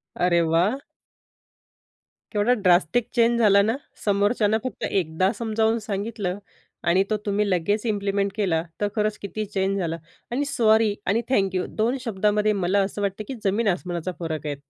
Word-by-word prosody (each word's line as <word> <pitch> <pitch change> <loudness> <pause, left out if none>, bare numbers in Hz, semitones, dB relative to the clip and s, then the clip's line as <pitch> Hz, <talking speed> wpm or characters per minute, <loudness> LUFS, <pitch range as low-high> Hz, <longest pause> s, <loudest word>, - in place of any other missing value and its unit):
अरे 175 -1 +2
वाह! 170 +9 +2 1.5
केवढा 215 +3 +2
ड्रास्टिक 185 +1 +2
चेंज 235 0 +3
झाला 200 -3 +5
ना, 220 +4 +1 0.3
समोरच्याला 205 +1 +2
फक्त 255 - -5
एकदा 185 +1 +1
समजावून 225 0 +1
सांगितलं 205 -2 -3 0.5
आणि 185 +3 +4
तो 215 - +1
तुम्ही 205 0 0
लगेच 205 +5 0
इम्प्लिमेंट 200 -2 0
केला, 180 -7 0 0.2
तर 205 - +2
खरंच 210 -1 0
किती 215 +2 -4
चेंज 195 -1 -1
झाला. 165 -2 -2 0.3
आणि 280 +4 0
सॉरी 220 -5 +3
आणि 210 +5 +2
थँक 195 -6 +1
यू 180 - 0
दोन 230 +5 +1
शब्दामध्ये 210 0 +1
मला 195 0 +1
असं 200 +1 -3
वाटतं, 200 +1 -2
की 265 - -5
जमीन 205 +3 +1
आसमानाचा 180 -1 -2
फरक 160 -3 -4
आहे. 145 -1 -2
205 Hz, 155 wpm, -24 LUFS, 185-220 Hz, 1.5 s, झाला